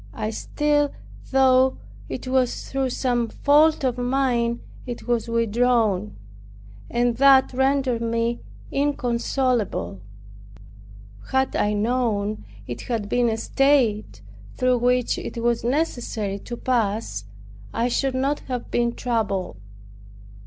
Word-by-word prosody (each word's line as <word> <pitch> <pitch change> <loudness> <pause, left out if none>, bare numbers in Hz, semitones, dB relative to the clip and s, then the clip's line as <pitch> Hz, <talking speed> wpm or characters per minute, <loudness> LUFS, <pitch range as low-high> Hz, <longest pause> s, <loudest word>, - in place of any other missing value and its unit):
I 215 -1 -2
still 290 +5 0 0.3
thought 260 -1 +4 0.3
it - - -6
was 255 -1 0
through 270 -1 0
some 245 -2 0
fault 300 +4 +3
of 250 -2 0
mine 245 -2 0 0.3
it 245 0 -6
was 240 -1 0
withdrawn, 230 - +1 0.7
and 240 -1 +1
that 270 -1 +6
rendered 265 -2 +1
me 230 +1 -1 0.3
inconsolable. 245 - -1 1.3
Had 265 0 +1
I 210 - +1
known 215 - -1 0.2
it 120 - -6
had 220 -4 -2
been 245 0 +2
a 220 - -1
state 225 - +1 0.3
through 255 -1 +2
which 250 0 +1
it - - -7
was 235 0 0
necessary 240 -7 -1
to 240 +4 -7
pass, 215 - -1 0.5
I 235 - 0
should 260 +2 0
not 275 +3 0
have 250 -2 -4
been 235 0 +1
troubled. 205 - -2
240 Hz, 115 wpm, -23 LUFS, 225-260 Hz, 1.3 s, that